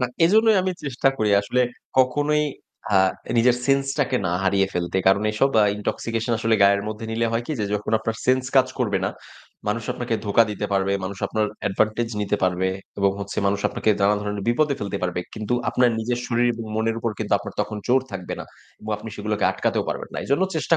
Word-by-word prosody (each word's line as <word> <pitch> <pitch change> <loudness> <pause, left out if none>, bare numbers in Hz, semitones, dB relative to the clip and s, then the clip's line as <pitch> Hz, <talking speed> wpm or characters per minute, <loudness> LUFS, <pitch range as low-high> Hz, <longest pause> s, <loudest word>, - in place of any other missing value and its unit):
না 125 - +2 0.2
এজন্যই 220 +4 +5
আমি 185 0 0
চেষ্টা 135 -1 +1
করি 105 -1 +2
আসলে 125 +5 0 0.4
কখনোই 145 +4 +3 0.5
আ - - +6 0.4
নিজের 125 +1 +4
সেন্সটাকে 135 -1 +1
না - - 0
হারিয়ে 95 0 +3
ফেলতে। 90 +1 -1
কারণ 95 +2 +5
এইসব 120 +6 +2
আ - - +5
ইনটক্সিকেশন 115 +3 -2
আসলে 115 0 +2
গায়ের 100 0 +5
মধ্যে 110 +1 -6
নিলে 115 +1 +1
হয় 115 +1 0
কি 155 - -2
যে - - +1
যখন 105 +2 -3
আপনার 115 0 -3
সেন্স 130 0 +3
কাজ 130 - +6
করবে 105 -6 +1
না, - - 0 0.6
মানুষ 115 +1 -1
আপনাকে 120 -2 -2
ধোঁকা 105 +3 +4
দিতে 105 0 -3
পারবে, 95 0 +1
মানুষ 95 +1 -5
আপনার 110 -1 0 0.2
অ্যাডভান্টেজ 110 +3 0
নিতে 105 0 0
পারবে 95 0 +1 0.3
এবং 100 0 +3
হচ্ছে 100 0 -5
মানুষ 100 0 +1
আপনাকে 110 - 0
নানা্ন 100 +1 +3
ধরনের 105 -1 -3
বিপদে 140 +4 +2
ফেলতে 100 -1 -3
পারবে। 90 -1 -1
কিন্তু 110 +2 -2 0.2
আপনার 125 -1 +3
নিজের 120 +2 -1
শরীর 120 0 +2
এবং 115 0 -6
মনের 110 +1 0
উপর 115 - -1
কিন্তু 110 - -3
আপনার 100 0 -8
তখন 105 - -3
জোর 130 +2 +5
থাকবে 90 -2 -5
না। - - -6 0.4
এবং 110 - -6
আপনি 110 +2 -9
সেগুলোকে 105 0 -1
আটকাতেও - - -1
পারবেন - - -4
না। - - -4
এজন্য 140 +7 +1
চেষ্টা 165 +2 +2
110 Hz, 200 wpm, -23 LUFS, 100-125 Hz, 0.6 s, আ